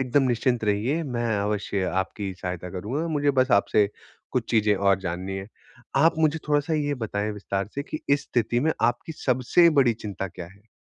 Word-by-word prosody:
एकदम 130 +2 +2
निश्चिंत 120 -1 +1
रहिए 110 +10 +1
मैं 120 -5 -2
अवश्य 100 -1 -1 0.2
आपकी 100 0 -6
सहायता 90 -1 -4
करूँगा। 110 - -3
मुझे 145 -2 +2
बस 130 +1 +1
आपसे 100 0 +4 0.4
कुछ 120 -3 -1
चीज़ें 110 -3 +3
और 100 0 +3
जाननी 95 +1 -4
हैं। 95 +1 -6 0.5
आप 160 +5 +5
मुझे 160 0 +2
थोड़ा-सा 145 +2 +1
ये 145 -1 0
बताएँ 105 -4 -2
विस्तार 100 -1 -3
से 140 - -2
कि 155 +1 -6
इस 140 0 +3
स्थिति 120 0 0
में 160 +4 +2
आपकी 120 +7 0
सबसे 135 +4 +3
बड़ी 125 -3 +4
चिंता 100 -3 -5
क्या 85 -1 -9
है? 100 +5 -19
115 Hz, 185 wpm, -25 LUFS, 100-140 Hz, 0.5 s, आप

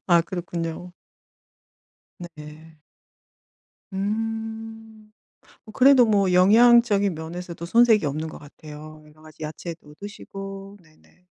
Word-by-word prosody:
아 175 -2 +5
그렇군요. 175 0 -6 1.3
네. 155 -2 -12 1.1
음. 220 +1 -5 0.5
뭐 220 - -13
그래도 260 0 +6
뭐 200 -4 +2
영양적인 205 +1 +5
면에서도 170 +2 -8
손색이 225 0 +4
없는 155 +3 -3
것 - - -10
같아요. 155 +1 -12
여러 150 +1 -21
가지 155 0 -12
야채도 155 0 -8
드시고 195 0 -9
네네. 160 +3 -27
180 Hz, 215 characters per minute, -23 LUFS, 160-220 Hz, 1.3 s, 그래도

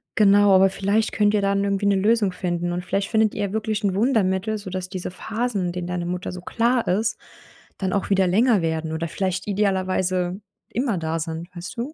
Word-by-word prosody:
genau, 205 -1 +5
aber 190 +1 +6
vielleicht 200 +3 0
könnt 210 0 +2
ihr 210 - +2
dann 200 0 +1
irgendwie 200 0 0
eine 200 0 +4
Lösung 210 +1 +2
finden 175 -1 -2
und 175 +1 -3
vielleicht 195 +1 -1
findet 220 -2 +2
ihr 205 -2 -2
wirklich 215 0 -2
ein 200 -2 +1
Wundermittel, 215 -2 +1
sodass 185 -3 -5
diese 185 -1 -5
Phasen, 220 +1 -2
in - - -2
denen 180 -1 -4
deine 180 -1 -3
Mutter 180 +1 -3
so 180 - -7
klar 235 +5 0
ist, 215 +5 0 0.6
dann 190 -1 -2
auch 200 - -1
wieder 195 -1 +3
länger 215 +3 +3
werden 160 -1 -2
oder 165 +1 -2
vielleicht 185 +2 -2
idealerweise 185 -2 0 0.3
immer 235 -3 -1
da 160 0 -2
sind, 165 +1 -5
weißt 175 +5 -7
du? 250 +6 -4
195 Hz, 200 wpm, -23 LUFS, 180-210 Hz, 0.6 s, aber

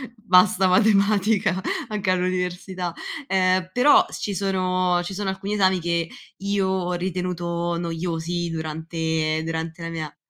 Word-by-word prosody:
"Basta 190 -3 +4
matematica! 200 -1 +3 0.3
Anche 205 -3 -1
all'università." 180 -1 -2 0.3
Uhm, 185 -1 +2
però 275 +4 +6
ci 200 -2 -4
sono 185 -2 +1
ci 190 +2 -6
sono 200 -1 -2
alcuni 195 +2 -4
esami 190 -2 +3
che 170 -1 -1 0.3
io 200 -1 0
ho 185 -1 -1
ritenuto 175 -1 -2
noiosi 170 0 -3
durante 160 0 -2
durante 165 +1 -4
la 165 - -4
mia 155 -3 -6
180 Hz, 120 wpm, -23 LUFS, 170-190 Hz, 0.3 s, però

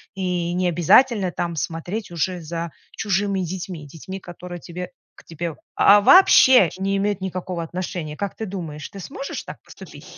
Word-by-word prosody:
И 180 -2 -1
не 180 0 +1
обязательно 185 - +4
там 170 -1 -3
смотреть 175 +6 -4
уже 175 +2 -2
за 165 0 -5 0.3
чужими 200 -1 0
детьми 180 -3 -5
детьми, 190 +6 -8
которые 175 0 -9
тебе 180 +1 -7 0.3
к - - -17
тебе, 165 +1 -5 0.3
а, 205 - +7
а, - - +3
вообще 260 - +7
не 195 +1 0
имеют 200 -1 -1
никакого 185 -2 -4
отношения. 170 -3 -5
Как 200 -1 -4
ты 220 - -5
думаешь, 165 -7 -6
ты 195 - -10
сможешь 275 +8 -6
так - - -10
поступить? - - -13
180 Hz, 165 wpm, -22 LUFS, 170-195 Hz, 0.3 s, а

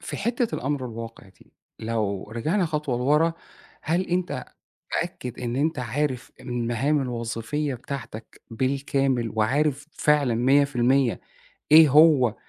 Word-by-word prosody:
في - - -6
حتّة 235 +2 -1
الأمر 135 -1 -2
الواقع 115 -3 -9
دي، 95 - -23 0.3
لو 105 -3 -3
رجعنا 160 - 0
خطوة 150 -6 -2
لورا، 150 +6 +2 0.5
هل 165 +4 0
أنت 175 -7 -2 0.5
متأكد 125 -2 -4
إن 120 0 -3
أنت 155 +1 0
عارف 130 +1 -2
المهام 125 +3 -1
الوظيفية 125 +4 -3
بتاعتك 115 -3 -8
بالكامل، 135 -1 0
وعارف 140 +6 0
فعلًا 145 -7 +2
100% 130 0 +2 0.5
إيه 160 0 +9
هو 145 -5 +5
130 Hz, 115 wpm, -24 LUFS, 120-150 Hz, 0.5 s, إيه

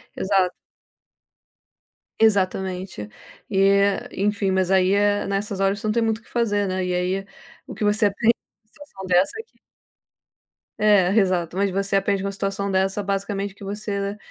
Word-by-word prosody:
Exato. 190 -2 +1 1.7
Exatamente. 190 - 0 0.4
E, 195 0 +4 0.3
enfim, 200 0 0
mas, 190 -1 +1
aí, 190 0 +4
é 205 0 +2
nessas 200 0 -2
horas 195 +1 +1
você 215 - -4
não - - +2
tem 235 0 +1
muito 220 -1 0
o - - -25
que - - -22
fazer, 205 -4 0
né, 185 0 -2
e, 180 - -1
aí, 180 +2 -1 0.4
o - - -7
que - - -4
você 210 +1 +3
aprende 220 +3 +2
numa 215 +1 -53
situação 240 -7 -12
dessa 180 +1 +3
é - - -5
que 465 - -36 1.2
É, 205 -4 +4
exato, 185 -4 +1
mas 200 0 +2
você 195 +1 -1
aprende 195 0 0
uma 200 - -2
situação 195 0 -3
dessa, 195 +2 0
basicamente, 200 0 -2
que 200 - -14
você 200 0 -4
195 Hz, 165 wpm, -23 LUFS, 190-205 Hz, 1.7 s, E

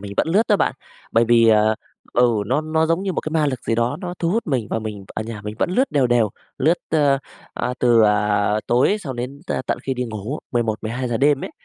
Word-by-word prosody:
mình 100 0 -7
vẫn - - +1
lướt 195 +7 +4
đó 205 - +5
bạn, - - 0 0.4
bởi 115 +1 +4
vì, 115 0 +5
ờ, 110 0 +4 0.4
ừ, 125 0 +4 0.2
nó 145 - +1
nó 160 +1 0
giống 165 +3 0
như 195 -2 -1
một - - -1
cái 155 - -5
ma 155 -1 +2
lực 130 -4 -2
gì 115 - 0
đó 120 +1 0
nó 180 -1 -5
thu 170 - 0
hút 225 +5 -1
mình 130 -8 -1
và - - 0
mình 105 -3 -6
ở - - -2
nhà 110 -1 -7
mình 105 0 -5
vẫn - - 0
lướt 255 +8 +1
đều 140 -3 +2
đều, 120 -3 +2 0.3
lướt, 165 +6 +3
ơ, 145 -3 +3 0.4
a, 125 - -2
từ, 120 -2 +5
à, 105 -1 +2 0.2
tối 125 - +3
xong 135 -9 -6
đến 125 +4 -5
t - - -2
tận - - -1
khi 135 - -2
đi 125 0 -2
ngủ, 110 +5 -5
11:00-12:00 120 +1 -1
đêm 140 +2 +2
ấy. - - -6
125 Hz, 245 wpm, -21 LUFS, 110-155 Hz, 0.4 s, đó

